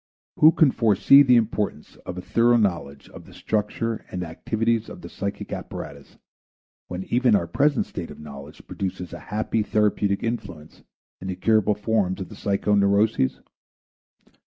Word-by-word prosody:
Who 155 Hz, -, +7 dB
can 160 Hz, -5 st, +4 dB
foresee 115 Hz, +5 st, +5 dB
the 125 Hz, -3 st, +5 dB
importance 110 Hz, -3 st, -1 dB
of 90 Hz, -, -6 dB
a -, -, -4 dB
thorough 120 Hz, +1 st, +3 dB
knowledge 85 Hz, -10 st, -2 dB
of -, -, -13 dB
the -, -, -15 dB
structure 110 Hz, +1 st, -2 dB
and 90 Hz, -1 st, -4 dB
activities 110 Hz, +7 st, -2 dB
of -, -, -10 dB
the -, -, -9 dB
psychic 100 Hz, +1 st, -5 dB
apparatus 70 Hz, -1 st, -8 dB, 0.7 s
when 90 Hz, +1 st, -5 dB
even 120 Hz, +1 st, +2 dB
our 85 Hz, -, +1 dB
present 140 Hz, -, +1 dB
state 85 Hz, -3 st, -7 dB
of 75 Hz, -, -11 dB
knowledge 75 Hz, 0 st, -11 dB
produces 90 Hz, -2 st, -5 dB
a 85 Hz, -, -7 dB
happy 110 Hz, +1 st, -1 dB
therapeutic 105 Hz, -1 st, 0 dB
influence 100 Hz, -10 st, -6 dB, 0.4 s
in 95 Hz, -, -8 dB
the 95 Hz, -, -3 dB
curable 105 Hz, +1 st, +2 dB
forms 105 Hz, -3 st, -1 dB
of 95 Hz, -, -6 dB
the 105 Hz, -, -11 dB
psychoneuroses? 100 Hz, -4 st, +1 dB
105 Hz, 155 wpm, -24 LUFS, 90-115 Hz, 0.7 s, Who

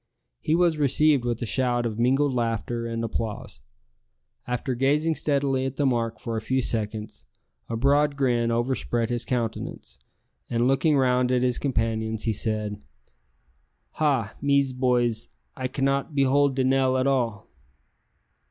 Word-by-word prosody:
He 155 Hz, -, +1 dB
was 170 Hz, -3 st, +2 dB
received 145 Hz, -1 st, +3 dB
with 120 Hz, 0 st, -2 dB
a -, -, -1 dB
shout 120 Hz, 0 st, +1 dB
of 110 Hz, -1 st, -3 dB
mingled 135 Hz, +3 st, +2 dB
laughter 115 Hz, 0 st, -2 dB
and 115 Hz, 0 st, -3 dB
applause. 115 Hz, -, -4 dB, 0.9 s
After 125 Hz, +1 st, -2 dB
gazing 145 Hz, +6 st, +1 dB
steadily 140 Hz, -3 st, 0 dB
at 135 Hz, 0 st, -3 dB
the 145 Hz, -, 0 dB
mark 115 Hz, -3 st, 0 dB
for 115 Hz, -1 st, -4 dB
a 110 Hz, -, -2 dB
few 130 Hz, +4 st, 0 dB
seconds, 105 Hz, -, -4 dB, 0.4 s
a 115 Hz, -, -2 dB
broad 140 Hz, +3 st, +2 dB
grin 120 Hz, -4 st, +1 dB
overspread 120 Hz, -1 st, -1 dB
his 120 Hz, 0 st, 0 dB
countenance, 115 Hz, -, -4 dB, 0.5 s
and 120 Hz, +1 st, +1 dB
looking 135 Hz, +3 st, +3 dB
round 125 Hz, -1 st, +2 dB
at 125 Hz, -1 st, +2 dB
his 125 Hz, -1 st, +2 dB
companions, 110 Hz, -4 st, -1 dB
he 110 Hz, -, 0 dB
said, 105 Hz, -1 st, -2 dB, 1.2 s
"Ha! 135 Hz, -9 st, +1 dB
mes 140 Hz, -2 st, +2 dB
boys, 120 Hz, -3 st, 0 dB, 0.3 s
I 130 Hz, -1 st, -3 dB
can 135 Hz, +1 st, -2 dB
not 140 Hz, +2 st, -1 dB
behold 140 Hz, 0 st, +3 dB
de 130 Hz, -, +1 dB
nail 130 Hz, 0 st, +2 dB
at 130 Hz, -, +1 dB
all!" 120 Hz, -7 st, -1 dB
125 Hz, 150 wpm, -25 LUFS, 115-135 Hz, 1.2 s, received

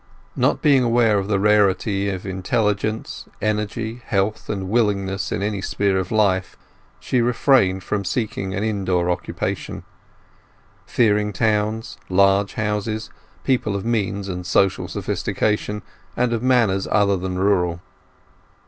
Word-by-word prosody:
Not -, -, +1 dB
being 140 Hz, -3 st, +5 dB
aware 115 Hz, -3 st, +3 dB
of 95 Hz, -, -3 dB
the 105 Hz, -1 st, +1 dB
rarity 100 Hz, -1 st, +2 dB
of 95 Hz, -1 st, -5 dB
intelligence, 105 Hz, +2 st, -1 dB
energy, 110 Hz, +2 st, -2 dB
health, 100 Hz, 0 st, -1 dB
and 95 Hz, -2 st, -3 dB
willingness 100 Hz, -3 st, 0 dB
in 100 Hz, -, -2 dB
any 100 Hz, -2 st, -2 dB
sphere 95 Hz, -1 st, 0 dB
of 95 Hz, -, -4 dB
life, 100 Hz, -4 st, +1 dB, 0.4 s
she 125 Hz, -, 0 dB
refrained 115 Hz, -6 st, +3 dB
from 100 Hz, -2 st, -2 dB
seeking 95 Hz, -2 st, -2 dB
an 100 Hz, -, -2 dB
indoor 95 Hz, -5 st, 0 dB
occupation; 90 Hz, -, -4 dB, 1.0 s
fearing 105 Hz, -2 st, +2 dB
towns, 110 Hz, +1 st, -1 dB
large 100 Hz, +1 st, +3 dB
houses, 110 Hz, 0 st, -2 dB, 0.3 s
people 120 Hz, -6 st, 0 dB
of 100 Hz, -, -4 dB
means 100 Hz, -4 st, -1 dB
and 90 Hz, -2 st, -5 dB
social 95 Hz, +1 st, +2 dB
sophistication, 105 Hz, -1 st, -2 dB, 0.3 s
and 125 Hz, -1 st, +1 dB
of 115 Hz, -, -1 dB
manners 115 Hz, -7 st, +2 dB
other 100 Hz, -2 st, +3 dB
than 90 Hz, 0 st, -3 dB
rural. 90 Hz, -3 st, +1 dB
105 Hz, 130 wpm, -21 LUFS, 95-110 Hz, 1.0 s, being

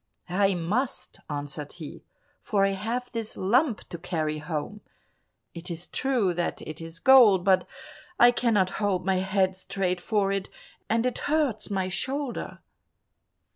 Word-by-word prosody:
"I 195 Hz, +1 st, +2 dB
must," 180 Hz, +2 st, -2 dB
answered 145 Hz, 0 st, -5 dB
he, 160 Hz, -4 st, -9 dB, 0.4 s
"for 200 Hz, -2 st, +1 dB
I -, -, +2 dB
have 230 Hz, +6 st, -3 dB
this 230 Hz, -3 st, -5 dB
lump 240 Hz, +5 st, +1 dB
to 170 Hz, -, -7 dB
carry 155 Hz, -3 st, -2 dB
home; 155 Hz, +6 st, -4 dB, 0.7 s
it 170 Hz, +2 st, -7 dB
is 170 Hz, 0 st, -5 dB
true 245 Hz, -9 st, 0 dB
that 175 Hz, 0 st, -2 dB
it 155 Hz, +1 st, -7 dB
is 165 Hz, 0 st, -7 dB
gold, 215 Hz, -4 st, +7 dB
but 190 Hz, -1 st, +4 dB, 0.5 s
I 240 Hz, 0 st, +8 dB
cannot 215 Hz, -6 st, +2 dB
hold 195 Hz, -3 st, 0 dB
my 190 Hz, -1 st, +2 dB
head 190 Hz, 0 st, +1 dB
straight 185 Hz, -1 st, -2 dB
for 200 Hz, -1 st, +1 dB
it, 195 Hz, -1 st, -2 dB, 0.4 s
and 230 Hz, +2 st, +2 dB
it 250 Hz, -, -1 dB
hurts 290 Hz, -9 st, 0 dB
my 190 Hz, -2 st, -1 dB
shoulder." 265 Hz, +7 st, -4 dB
195 Hz, 145 wpm, -27 LUFS, 175-230 Hz, 0.7 s, I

